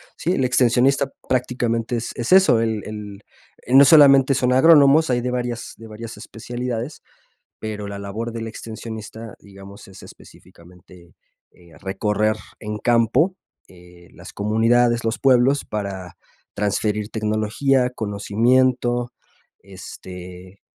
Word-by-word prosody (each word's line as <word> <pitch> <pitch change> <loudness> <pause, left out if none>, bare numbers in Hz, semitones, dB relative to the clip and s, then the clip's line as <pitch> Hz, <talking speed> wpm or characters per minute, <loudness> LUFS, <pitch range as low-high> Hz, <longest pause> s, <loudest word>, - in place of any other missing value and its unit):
Sí, 175 - -2
el 130 - 0
extensionista 130 +3 +2 0.2
prácticamente 120 -2 -1
es 115 - -4
es 120 +7 -4
eso, 190 -12 +5
el 110 -2 -2
el 105 -1 -8 0.6
no 140 - +9
solamente 135 -3 +6
son 125 +1 +1
agrónomos, 150 +1 +5
hay 120 -1 +1
de 125 0 -3
varias 120 -1 -4
de 115 - -12
varias 110 +1 -9
especialidades. 120 +3 -6 0.6
Pero 105 -2 -6
la 100 0 -7
labor 105 +4 -5
del 115 -1 -5
extensionista, 110 0 -9
digamos, 100 0 -14
es 95 -1 -14
específicamente, 85 0 -18 0.4
eh, 85 -2 -21
recorrer 105 +2 -1 0.2
en 105 0 -5
campo, 120 - +2 0.3
eh, 90 -1 -18
las - - -13
comunidades, 115 +3 +1
los 115 - -1
pueblos, 135 +1 +3
para 95 -4 -6 0.4
transferir 105 +1 -2
tecnología, 110 +5 0
conocimiento, 120 +3 0 0.5
este 90 -1 -12
115 Hz, 120 wpm, -21 LUFS, 100-125 Hz, 0.6 s, no